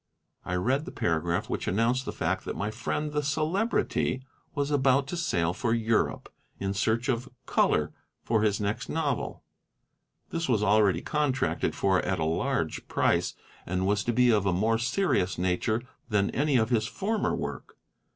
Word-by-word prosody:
I 90 Hz, -, -3 dB
read 130 Hz, +11 st, +1 dB
the 190 Hz, -, -7 dB
paragraph, 85 Hz, +1 st, 0 dB
which -, -, -3 dB
announced 115 Hz, +6 st, +1 dB
the -, -, -3 dB
fact -, -, -1 dB
that -, -, -4 dB
my 105 Hz, +2 st, -2 dB
friend 140 Hz, +7 st, -2 dB
the 150 Hz, 0 st, 0 dB
Celebrity 155 Hz, -, 0 dB, 0.3 s
was 145 Hz, 0 st, -1 dB
about 135 Hz, -1 st, +3 dB
to 175 Hz, -, -3 dB
sail 85 Hz, -, 0 dB
for 115 Hz, +5 st, 0 dB
Europe 115 Hz, -1 st, 0 dB, 0.3 s
in 95 Hz, 0 st, -1 dB
search 110 Hz, +4 st, 0 dB
of 125 Hz, 0 st, -1 dB, 0.2 s
"color" -, -, +2 dB, 0.3 s
for 110 Hz, -2 st, +1 dB
his 105 Hz, -2 st, +2 dB
next 105 Hz, 0 st, -2 dB
novel; 150 Hz, -5 st, -2 dB, 0.9 s
this 165 Hz, -3 st, -2 dB
was 110 Hz, -4 st, +2 dB
already 100 Hz, -4 st, +4 dB
contracted 145 Hz, -3 st, 0 dB
for 95 Hz, -2 st, +2 dB
at 95 Hz, +1 st, -1 dB
a 80 Hz, -, -1 dB
large 80 Hz, +1 st, -1 dB
price, -, -, +1 dB, 0.3 s
and 90 Hz, +1 st, -1 dB
was 105 Hz, +1 st, +1 dB
to 120 Hz, -, +1 dB
be 125 Hz, +1 st, +4 dB
of 105 Hz, -3 st, +2 dB
a 95 Hz, -, +2 dB
more 110 Hz, +5 st, +2 dB
serious 120 Hz, -, +1 dB
nature 95 Hz, +6 st, 0 dB, 0.3 s
than 100 Hz, -2 st, +2 dB
any 145 Hz, 0 st, +2 dB
of 110 Hz, +1 st, +1 dB
his 110 Hz, -2 st, +2 dB
former 210 Hz, -, -1 dB
work. -, -, -6 dB
115 Hz, 170 wpm, -28 LUFS, 100-140 Hz, 0.9 s, already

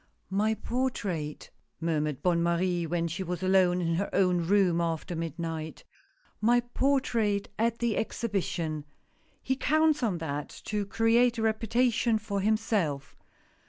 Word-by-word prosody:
"My 215 Hz, +3 st, +1 dB
portrait," 205 Hz, -, -3 dB, 0.3 s
murmured 155 Hz, -4 st, -1 dB
Bonne 175 Hz, -2 st, +2 dB
Marie, 170 Hz, 0 st, +1 dB
when 170 Hz, +1 st, 0 dB
she 170 Hz, +4 st, -4 dB
was 180 Hz, 0 st, -4 dB
alone 185 Hz, -1 st, +3 dB
in 165 Hz, -1 st, 0 dB
her 200 Hz, -, -1 dB
own 180 Hz, -2 st, +3 dB
room 185 Hz, -3 st, +3 dB
after 165 Hz, +1 st, -2 dB
midnight. 165 Hz, -1 st, -5 dB, 0.3 s
" -, -, -37 dB
My 245 Hz, 0 st, +5 dB
portrait 240 Hz, -5 st, 0 dB
at 230 Hz, +1 st, +1 dB
the 235 Hz, -2 st, 0 dB
Exhibition. 170 Hz, -9 st, -2 dB, 0.6 s
He 265 Hz, -, 0 dB
counts 310 Hz, +2 st, +2 dB
on 210 Hz, -7 st, 0 dB
that 150 Hz, -3 st, -4 dB, 0.2 s
to 210 Hz, -2 st, -2 dB
create 230 Hz, +3 st, +3 dB
a 225 Hz, -, -1 dB
reputation 230 Hz, +1 st, +2 dB
for 200 Hz, -2 st, -3 dB
himself. 200 Hz, -, 0 dB
195 Hz, 135 wpm, -29 LUFS, 170-225 Hz, 0.6 s, My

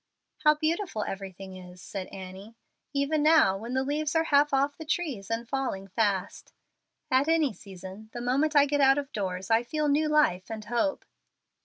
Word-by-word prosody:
"How 300 Hz, -1 st, +5 dB
beautiful 315 Hz, -, -1 dB
everything 195 Hz, -1 st, -7 dB
is," 180 Hz, 0 st, -12 dB
said 190 Hz, +1 st, -6 dB
Annie, 190 Hz, +3 st, -10 dB, 0.4 s
"even 285 Hz, +2 st, 0 dB
now, 305 Hz, -11 st, +5 dB
when 230 Hz, +6 st, -5 dB
the 260 Hz, -, +1 dB
leaves 295 Hz, +2 st, -1 dB
are 325 Hz, -, +4 dB
half 295 Hz, -2 st, +3 dB
off 280 Hz, +1 st, +1 dB
the 320 Hz, -, -8 dB
trees 300 Hz, -, -3 dB
and 230 Hz, +1 st, -2 dB
falling 245 Hz, -8 st, -3 dB
fast! 200 Hz, -2 st, -1 dB, 0.6 s
At 260 Hz, +3 st, +3 dB
any 320 Hz, -6 st, +2 dB
season, 190 Hz, +2 st, -11 dB
the 240 Hz, -, -6 dB
moment 275 Hz, +6 st, +1 dB
I 285 Hz, -1 st, +7 dB
get 290 Hz, 0 st, 0 dB
out 270 Hz, 0 st, +6 dB
of 280 Hz, -1 st, -3 dB
doors 190 Hz, -1 st, -3 dB
I 225 Hz, +1 st, +5 dB
feel 300 Hz, +5 st, -2 dB
new 305 Hz, +2 st, +2 dB
life 240 Hz, -12 st, +2 dB
and 220 Hz, -1 st, -6 dB
hope." 240 Hz, +6 st, -1 dB
255 Hz, 180 wpm, -28 LUFS, 195-295 Hz, 0.6 s, I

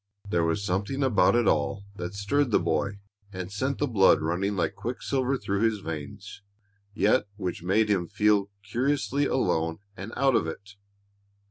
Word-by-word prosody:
There 85 Hz, -4 st, +1 dB
was 85 Hz, +5 st, 0 dB
something 100 Hz, +9 st, -1 dB
about 110 Hz, -6 st, +4 dB
it 120 Hz, -2 st, +3 dB
all 90 Hz, +7 st, +1 dB
that 90 Hz, +1 st, -5 dB
stirred 125 Hz, +8 st, +1 dB
the 110 Hz, -, +4 dB
boy 100 Hz, +1 st, -1 dB, 0.3 s
and 95 Hz, -1 st, -6 dB
sent 130 Hz, +7 st, -1 dB
the 145 Hz, -, +1 dB
blood 105 Hz, -, +5 dB
running 90 Hz, +6 st, -1 dB
like 90 Hz, -, 0 dB
quick 120 Hz, +2 st, -5 dB
silver 135 Hz, 0 st, 0 dB
through 100 Hz, -4 st, -2 dB
his 110 Hz, -1 st, +2 dB
veins, 80 Hz, +5 st, -7 dB, 0.5 s
yet 105 Hz, 0 st, +3 dB
which 95 Hz, -5 st, -4 dB
made 100 Hz, +5 st, +2 dB
him 95 Hz, -5 st, +1 dB
feel 105 Hz, -1 st, +2 dB
curiously 140 Hz, +6 st, 0 dB
alone 80 Hz, -8 st, 0 dB, 0.2 s
and 100 Hz, +4 st, -7 dB
out 135 Hz, -2 st, +3 dB
of 80 Hz, -, +2 dB
it. 100 Hz, +5 st, -7 dB
100 Hz, 165 wpm, -27 LUFS, 90-120 Hz, 0.5 s, blood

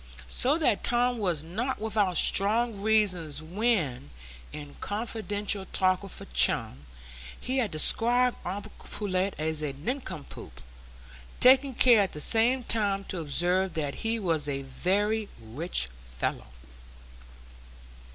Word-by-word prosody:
So 280 Hz, +5 st, +4 dB
that 295 Hz, -11 st, 0 dB
Tom 245 Hz, 0 st, +1 dB
was 175 Hz, -7 st, -1 dB
not 225 Hz, +11 st, -4 dB
without 210 Hz, -4 st, 0 dB
strong 215 Hz, +1 st, +4 dB
reasons 185 Hz, -9 st, 0 dB
when, 160 Hz, -, -2 dB, 0.4 s
in 145 Hz, -1 st, -10 dB
confidential 210 Hz, -2 st, -2 dB
talk 185 Hz, -1 st, +1 dB
with 195 Hz, -2 st, -7 dB
a -, -, -9 dB
chum, 65 Hz, +2 st, +1 dB, 0.5 s
he 260 Hz, +1 st, -2 dB
had 230 Hz, -5 st, 0 dB
described 240 Hz, +10 st, +3 dB
uncle 195 Hz, +3 st, -6 dB
Pullet 195 Hz, -1 st, -3 dB
as 155 Hz, 0 st, -2 dB
a 145 Hz, -2 st, -3 dB
nincompoop, 185 Hz, -, -7 dB, 0.8 s
taking 265 Hz, +1 st, +5 dB
care 235 Hz, -4 st, +5 dB
at 195 Hz, -, -2 dB
the 150 Hz, -, -6 dB
same 235 Hz, -, +3 dB
time 200 Hz, -4 st, 0 dB
to 185 Hz, -, -2 dB
observe 175 Hz, +4 st, -1 dB
that 145 Hz, -3 st, -3 dB
he 225 Hz, 0 st, -1 dB
was 165 Hz, -8 st, -1 dB
a 140 Hz, -1 st, -3 dB
very 205 Hz, +10 st, -1 dB
"rich 115 Hz, -, -1 dB, 0.2 s
fellow." -, -, -5 dB
195 Hz, 125 wpm, -27 LUFS, 155-225 Hz, 0.8 s, taking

